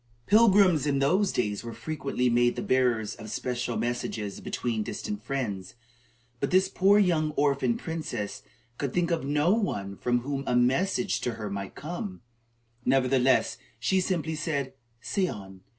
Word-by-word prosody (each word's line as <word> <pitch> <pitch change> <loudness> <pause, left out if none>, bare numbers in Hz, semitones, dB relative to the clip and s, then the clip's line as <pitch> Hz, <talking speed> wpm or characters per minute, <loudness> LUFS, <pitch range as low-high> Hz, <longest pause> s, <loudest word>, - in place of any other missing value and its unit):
Pilgrims 195 - +5
in 140 -1 +2
those 180 +9 +2
days 105 -3 -1
were 115 -1 -7
frequently 140 -5 -2
made 120 0 +3
the - - -3
bearers 120 -5 +1
of 110 - -10
special 120 +1 -2
messages 115 -4 -3
between 115 -3 -2
distant 210 - -4
friends; 110 -10 -4 0.6
but 140 - -1
this 185 +1 +4
poor 195 +1 +4
young 170 -6 +3
orphan 145 +10 +1
princess 155 - -4 0.4
could 140 -3 -2
think 175 -1 +1
of 165 -3 0
no 145 +6 +2
one 100 - -2
from 120 +3 0
whom 140 +2 -3
a - - +1
message 170 +11 +2
to 120 - -1
her 105 -2 -5
might 100 -1 -5
come, 185 - -6 0.6
Nevertheless, 130 0 +2 0.2
she 185 +11 +2
simply 165 -4 -1
said: 145 -4 -2 0.3
"Say 140 +10 0
on." 95 - -8
135 Hz, 150 wpm, -28 LUFS, 120-175 Hz, 0.6 s, Pilgrims